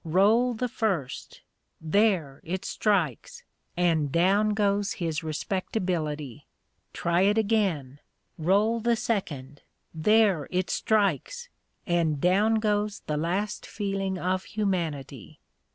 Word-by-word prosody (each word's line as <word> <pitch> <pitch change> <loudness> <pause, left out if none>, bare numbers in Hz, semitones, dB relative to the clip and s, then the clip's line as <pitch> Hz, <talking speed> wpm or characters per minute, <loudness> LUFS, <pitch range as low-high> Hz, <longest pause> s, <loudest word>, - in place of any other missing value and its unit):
Roll 215 +9 +3
the 250 +3 -1
first 195 - -3 0.4
there! 160 -5 +1
it 185 +4 -4
strikes! 345 - -1 0.3
and 165 -5 +2
down 200 +6 +3
goes 205 -1 +1
his 165 -4 -3
respectability. 155 - -3 0.4
Try 170 +1 0
it 205 +3 +3
again. 195 - 0 0.4
Roll 205 +8 +2
the 235 +1 +2
second 150 - -3 0.3
there! 195 -1 +3
it 185 0 -1
strikes! 220 - 0 0.4
and 165 -4 +1
down 200 +7 +3
goes 210 -1 0
the 150 - -3
last 180 +7 -2
feeling 195 -2 -2
of 185 +1 -1
humanity. 165 - -3
190 Hz, 105 wpm, -27 LUFS, 160-210 Hz, 0.4 s, Roll